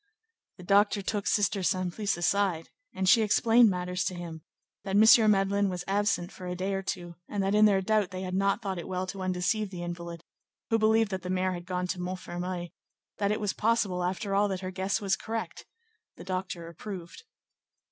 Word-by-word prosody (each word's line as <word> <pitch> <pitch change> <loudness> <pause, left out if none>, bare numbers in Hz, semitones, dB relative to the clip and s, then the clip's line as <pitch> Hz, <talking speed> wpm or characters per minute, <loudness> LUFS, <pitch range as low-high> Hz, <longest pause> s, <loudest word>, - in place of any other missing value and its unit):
The 180 - -11
doctor 200 +2 +3
took 205 0 -2
Sister 205 -1 +2
Simplice 185 +2 -1
aside, 175 -1 0 0.3
and 190 - -1
she 225 +4 +6
explained 225 +2 +5
matters 180 -1 -2
to 185 - -2
him; 170 -2 -7 0.4
that 195 -1 -2
M. 220 +1 +7
Madeleine 200 0 +2
was 180 -1 -4
absent 200 -2 0
for 180 - -9
a 180 - -3
day 190 +2 -2
or 195 - -1
two, 175 -3 -5
and 205 -2 -1
that 195 +1 0
in 210 0 +6
their 200 -2 +4
doubt 215 -1 +2
they 185 0 -6
had 185 -1 -4
not 195 +4 +1
thought 190 -3 -3
it - - -7
well 185 0 -2
to 190 +1 -6
undeceive 185 +3 0
the 180 -2 -6
invalid, 170 -1 -6 0.5
who 225 - +3
believed 220 0 +3
that 190 -1 -3
the 180 - -6
mayor 185 0 0
had 175 -1 -6
gone 180 -1 -2
to 180 0 -3
Montfermeil; 180 -1 -4 0.5
that 200 -1 +1
it 210 - 0
was 205 -2 -1
possible, 210 -5 +1
after 190 +3 -2
all, 205 +1 +3
that 190 -2 -3
her 185 0 -4
guess 190 +2 -1
was 195 -4 +1
correct: 225 +4 -5 0.5
the - - -9
doctor 185 -2 -4
approved. 175 - -8
190 Hz, 200 wpm, -28 LUFS, 180-205 Hz, 0.5 s, M